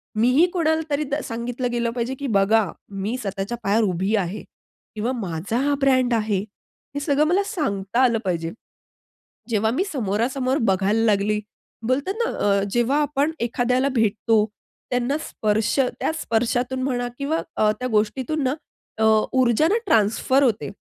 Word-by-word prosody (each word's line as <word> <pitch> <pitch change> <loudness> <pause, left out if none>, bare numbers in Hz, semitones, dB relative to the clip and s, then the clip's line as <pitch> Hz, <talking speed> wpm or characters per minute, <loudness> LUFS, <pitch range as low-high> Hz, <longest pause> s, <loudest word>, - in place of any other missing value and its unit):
मी 225 +3 +3
ही 340 - +7
कोणाला 320 -3 +1
तरी 290 +1 0
द - - +2
सांगितलं 240 +1 -3
गेलं 235 -1 0
पाहिजे 245 +2 -2
की 280 - -3
"बघा, 205 -1 +3 0.2
मी 205 +5 -3
स्वतःच्या 200 +1 -4
पायावर 215 +3 +2
उभी 190 +4 0
आहे" 200 0 -2 0.5
किंवा 225 +4 -1
"माझा 195 0 -3
हा 285 - +2
ब्रँड 255 -2 +3
आहे." 215 -3 +1 0.6
हे - - 0
सगळं 290 0 +2
मला 375 +5 +2
सांगता 235 - -1
आलं 235 -3 +3
पाहिजे. 165 -3 -1 1.0
जेव्हा 220 -1 +1
मी 370 - +1
समोरासमोर 255 +4 0
बघायला 200 +4 +1
लागली, 210 -1 +2 0.5
बोलतात 280 +9 0
ना, - - -1
अ, 200 -1 +2
जेव्हा 240 +6 +2
आपण 295 +2 0
एखाद्याला 250 +3 +1
भेटतो, 225 -3 +2 0.5
त्यांना 250 +3 0
स्पर्श 215 0 0 0.3
त्या - - 0
स्पर्शातून 245 +3 0
म्हणा 245 -2 -1
किंवा 290 +3 -1 0.2
अ, 215 0 +3
त्या 255 - -1
गोष्टीतून 250 +7 0
ना 260 - +1 0.4
अ, - - 0 0.3
ऊर्जा 255 +2 +3
ना, 420 - +2
ट्रान्सफर 230 - +3
होते. 225 -5 +1
235 Hz, 155 wpm, -23 LUFS, 210-270 Hz, 1.0 s, ही